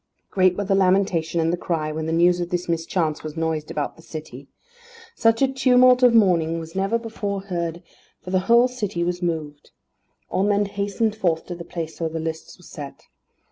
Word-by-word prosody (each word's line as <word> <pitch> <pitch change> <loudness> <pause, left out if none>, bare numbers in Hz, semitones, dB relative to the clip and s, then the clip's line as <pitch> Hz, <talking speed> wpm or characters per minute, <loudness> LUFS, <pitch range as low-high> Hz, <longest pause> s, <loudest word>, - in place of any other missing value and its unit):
Great 185 -1 +3
were 205 - -1
the 195 - +1
lamentation 185 -3 +2
and 165 +1 +1
the - - 0
cry 160 -3 -2
when 155 +1 -4
the - - -1
news 175 +2 +3
of 175 0 -3
this 175 0 -2
mischance 165 -1 -1
was 155 0 -7
noised 160 -2 -2
about 145 - -3
the - - -14
city. 150 -5 -9 0.7
Such 225 +3 +2
a - - +5
tumult 255 -1 +4
of 245 -2 +6
mourning 170 -6 +3
was 165 0 -9
never 195 +4 +1
before 210 -4 -4
heard, 170 -3 -4 0.4
for 180 - -7
the 185 - +3
whole 235 +1 +6
city 210 -8 -3
was 175 +1 -2
moved. 155 -4 -4 0.6
All - - -1
men 205 +1 +2
hastened 205 +2 -1
forth 170 -6 0
to 175 - -6
the 170 - -8
place 165 -1 -6
where 165 - 0
the 160 0 -4
lists 160 0 -6
were 180 - -19
set. 145 -5 -9
175 Hz, 200 wpm, -23 LUFS, 160-200 Hz, 0.7 s, of